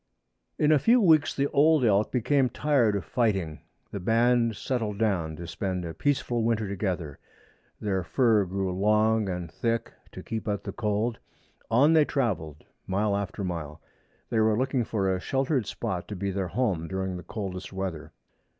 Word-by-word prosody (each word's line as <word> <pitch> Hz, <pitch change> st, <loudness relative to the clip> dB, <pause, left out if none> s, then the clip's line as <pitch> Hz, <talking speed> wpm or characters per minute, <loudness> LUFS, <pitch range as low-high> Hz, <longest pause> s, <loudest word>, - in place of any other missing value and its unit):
In 150 Hz, 0 st, +3 dB
a 150 Hz, -, +5 dB
few 235 Hz, -, +4 dB
weeks 160 Hz, -8 st, +4 dB
the 140 Hz, -, +1 dB
old 150 Hz, -1 st, +4 dB
elk 105 Hz, -1 st, +2 dB
became 130 Hz, +2 st, +2 dB
tired 125 Hz, -5 st, +2 dB
of 95 Hz, -4 st, -3 dB
fighting. 95 Hz, -10 st, 0 dB, 0.3 s
The 100 Hz, -, -4 dB
band 115 Hz, +3 st, +2 dB
settled 110 Hz, -2 st, -2 dB
down 90 Hz, -8 st, 0 dB
to 85 Hz, -, -8 dB
spend 90 Hz, +1 st, -3 dB
a 80 Hz, -, -5 dB
peaceful 120 Hz, -, 0 dB
winter 110 Hz, -2 st, 0 dB
together. 90 Hz, -7 st, -3 dB, 0.6 s
Their 95 Hz, -3 st, -1 dB
fur 110 Hz, +1 st, +3 dB
grew 95 Hz, +1 st, -2 dB
long 105 Hz, +2 st, +2 dB
and 90 Hz, -2 st, -4 dB
thick 115 Hz, +5 st, -2 dB, 0.2 s
to -, -, -8 dB
keep 110 Hz, 0 st, -5 dB
out 100 Hz, -1 st, -2 dB
the 100 Hz, -, -5 dB
cold. 105 Hz, +2 st, -1 dB, 0.5 s
On 135 Hz, +8 st, +5 dB
they 160 Hz, -2 st, +6 dB
travelled 80 Hz, -, -2 dB, 0.2 s
mile 100 Hz, +2 st, +1 dB
after 100 Hz, 0 st, -3 dB
mile. 80 Hz, -4 st, -5 dB, 0.5 s
They 115 Hz, -, +2 dB
were 110 Hz, -1 st, +3 dB
looking 130 Hz, -1 st, 0 dB
for 100 Hz, -3 st, -1 dB
a 95 Hz, -1 st, +1 dB
sheltered 135 Hz, -, 0 dB
spot 95 Hz, -7 st, -4 dB
to 105 Hz, -, -6 dB
be 100 Hz, +1 st, -2 dB
their 95 Hz, -1 st, -2 dB
home 95 Hz, -4 st, -1 dB
during 95 Hz, 0 st, -3 dB
the 90 Hz, -, -6 dB
coldest 90 Hz, -2 st, -6 dB
weather. 95 Hz, -5 st, -5 dB
105 Hz, 170 wpm, -27 LUFS, 95-120 Hz, 0.6 s, they